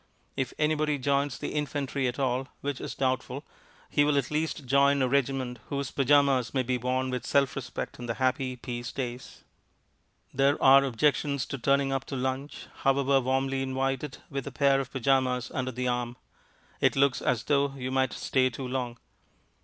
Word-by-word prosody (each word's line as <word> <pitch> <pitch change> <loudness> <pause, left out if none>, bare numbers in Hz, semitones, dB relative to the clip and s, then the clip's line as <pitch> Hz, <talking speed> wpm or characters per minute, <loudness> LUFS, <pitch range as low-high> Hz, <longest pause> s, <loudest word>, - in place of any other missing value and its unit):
If 130 -2 -2
anybody 150 -1 +1
joins 140 0 0
the - - -4
infantry 145 -2 -1
at 120 - -3
all 130 -1 0
(which 140 -2 -3
is - - -5
doubtful), 130 +1 -1 0.4
he 145 - +3
will 145 -1 +2
at 140 0 0
least 150 -1 -2
join 140 +2 +4
a 130 - +2
regiment 130 -2 0
whose 140 -1 -3
pyjamas 135 -3 +3
may 130 - +2
be 125 0 -1
worn 130 +1 -1
with 125 -1 -3
self 140 -1 +2
respect 130 -3 -5
in 120 - -6
the 115 - -2
happy 130 0 0
peace 120 -1 -5
days. 125 -2 -6 0.9
There 140 +2 +3
are 135 +1 +7
objections 140 +1 +1
to 140 - -5
turning 140 +2 +2
up 135 -1 -2
to 140 - -5
lunch 130 +2 -3
(however 135 0 +3
warmly 135 +1 0
invited) 135 +1 -2
with 135 -2 -4
a - - -4
pair 140 -1 +3
of 135 -1 -4
pyjamas 130 -1 +1
under 130 0 -2
the 125 +1 -3
arm. 120 0 -2 0.6
It - - +3
looks 135 -2 +3
as 120 -3 0
though 140 0 +1
you 130 -1 -4
might 130 -1 +1
stay 130 -1 +1
too 130 +2 -6
long. 125 -2 -3
135 Hz, 175 wpm, -28 LUFS, 125-140 Hz, 0.9 s, are